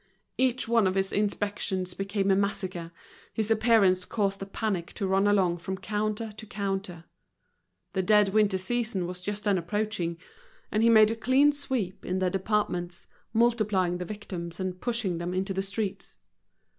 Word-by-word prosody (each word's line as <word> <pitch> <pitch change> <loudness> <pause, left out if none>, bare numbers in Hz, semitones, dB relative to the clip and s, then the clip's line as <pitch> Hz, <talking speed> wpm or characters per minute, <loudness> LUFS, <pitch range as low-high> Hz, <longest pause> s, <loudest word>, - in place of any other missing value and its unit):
Each 255 -1 +1
one 230 -3 +4
of 185 - 0
his 195 0 0
inspections 200 -3 -1
became 195 0 0
a - - +5
massacre, 190 -4 -2 0.4
his 220 0 -1
appearance 215 -5 +4
caused 195 -1 -1
a 195 - -5
panic 195 -4 -3
to 200 - -3
run 195 +1 +2
along 185 -4 +2
from 190 +3 -4
counter 215 +2 -2
to 220 - -8
counter. 195 -4 -3 0.9
The 190 - +1
dead 210 +1 +4
winter 205 -1 +3
season 210 -1 -1
was 180 +1 -6
just 205 +2 -4
then 200 -3 +2
approaching, 175 -2 -2 0.5
and 215 - +1
he 230 - +5
made 220 -1 +7
a - - -1
clean 260 +6 +4
sweep 255 -10 -3
in 185 - -2
the 185 -1 +1
departments, 190 -3 -1 0.3
multiplying 215 -6 +2
the 180 - -3
victims 180 -4 -6
and 185 -1 -4
pushing 230 -8 0
them 175 +1 -3
into 190 +1 -1
the 190 - -1
streets. 200 - -4
200 Hz, 165 wpm, -28 LUFS, 185-215 Hz, 0.9 s, made